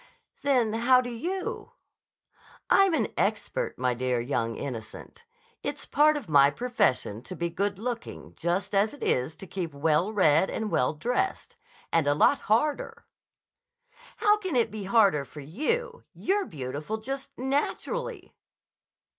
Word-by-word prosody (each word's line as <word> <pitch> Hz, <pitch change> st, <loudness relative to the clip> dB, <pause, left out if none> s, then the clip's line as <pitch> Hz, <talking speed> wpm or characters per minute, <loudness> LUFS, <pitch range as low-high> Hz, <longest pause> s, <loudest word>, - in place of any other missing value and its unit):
"Then 255 Hz, -6 st, +2 dB
how 245 Hz, +3 st, +5 dB
do 245 Hz, -1 st, -3 dB
you?" 385 Hz, -, -4 dB, 1.0 s
"I'm 390 Hz, -3 st, +5 dB
an -, -, 0 dB
expert, -, -, -1 dB
my 125 Hz, -1 st, +1 dB
dear 125 Hz, 0 st, -1 dB
young 115 Hz, -2 st, -1 dB
innocent. 125 Hz, -, -8 dB, 0.4 s
It's -, -, -4 dB
part 305 Hz, +1 st, +4 dB
of 280 Hz, -, -7 dB
my 140 Hz, -2 st, +6 dB
profession 145 Hz, -, 0 dB
to 185 Hz, -, -8 dB
be 170 Hz, -1 st, -2 dB
good 200 Hz, +3 st, -1 dB
looking 235 Hz, +2 st, -6 dB
just 175 Hz, +5 st, -2 dB
as 205 Hz, +6 st, +2 dB
it 290 Hz, -, -9 dB
is 130 Hz, +5 st, 0 dB
to -, -, -10 dB
keep 175 Hz, -5 st, -5 dB
well 155 Hz, +7 st, +2 dB
read 180 Hz, -4 st, +4 dB
and 220 Hz, -1 st, -3 dB
well 125 Hz, +5 st, +1 dB
dressed. 245 Hz, -, -2 dB, 0.4 s
And 165 Hz, -3 st, +3 dB
a 145 Hz, -, +3 dB
lot 275 Hz, -, +4 dB
harder!" 300 Hz, -, 0 dB, 1.1 s
"How 420 Hz, 0 st, +4 dB
can 375 Hz, -8 st, -4 dB
it 235 Hz, -2 st, +2 dB
be 210 Hz, -2 st, -6 dB
harder 195 Hz, -8 st, +4 dB
for 145 Hz, +2 st, -11 dB
you? 460 Hz, -, -2 dB
You're 395 Hz, +1 st, 0 dB
beautiful 145 Hz, +7 st, -5 dB
just 270 Hz, +5 st, -6 dB
naturally." 285 Hz, -, -2 dB
215 Hz, 145 wpm, -27 LUFS, -, 1.1 s, my